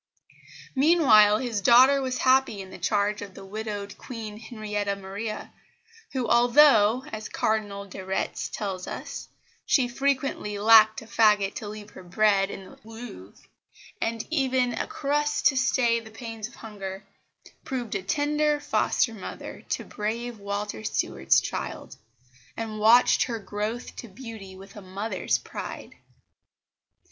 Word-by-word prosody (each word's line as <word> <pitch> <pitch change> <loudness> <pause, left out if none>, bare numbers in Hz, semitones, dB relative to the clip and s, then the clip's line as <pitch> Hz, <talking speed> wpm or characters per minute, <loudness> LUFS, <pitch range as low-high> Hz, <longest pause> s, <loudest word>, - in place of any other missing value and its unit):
Meanwhile 260 -9 +6
his 230 -4 -2
daughter 260 +6 +6
was 255 -1 -2
happy 260 -5 +3
in 190 -1 -8
the - - -10
charge 205 +3 0
of 200 -2 -9
the 195 - -10
widowed 205 0 -6
Queen 220 -4 -7
Henrietta 210 -3 -3
Maria, 200 +3 -6 0.6
who 255 -3 -1
although, 240 -1 +5
as 215 0 -5
Cardinal 205 -2 -1
de 190 -1 -9
Retz 190 +1 -2
tells 190 -3 -4
us, - - -6 0.4
she 260 -4 +3
frequently 265 -5 -1
"lacked 220 +1 +6
a - - -13
faggot 210 -3 +3
to 215 - -6
leave 210 0 -9
her - - -11
bed 195 +2 +2
in 195 - -7
the - - -16
Louvre," 225 - -11 0.6
and 225 0 -2
even 260 -5 +1
a - - -3
crust 295 +1 -1
to 275 - +5
stay 245 -2 +2
the 225 -1 -12
pangs 225 -1 -7
of 240 - -17
hunger, 195 -3 -8 0.6
proved 245 -5 -4
a 195 - -1
tender 295 +8 +1
foster 250 -4 +1
mother 200 -4 -8
to - - -1
brave 230 +2 -4
Walter 200 - -4
Stuart's 65 -10 +2
child, - - -5 0.6
and 220 -1 -4
watched 230 +3 +5
her 235 -2 -3
growth 210 +3 -5
to 235 - -7
beauty 210 -3 -10
with 195 +1 -13
a 205 - -9
mother's 195 +4 -2
pride. - - -8
220 Hz, 140 wpm, -26 LUFS, 200-245 Hz, 0.6 s, Meanwhile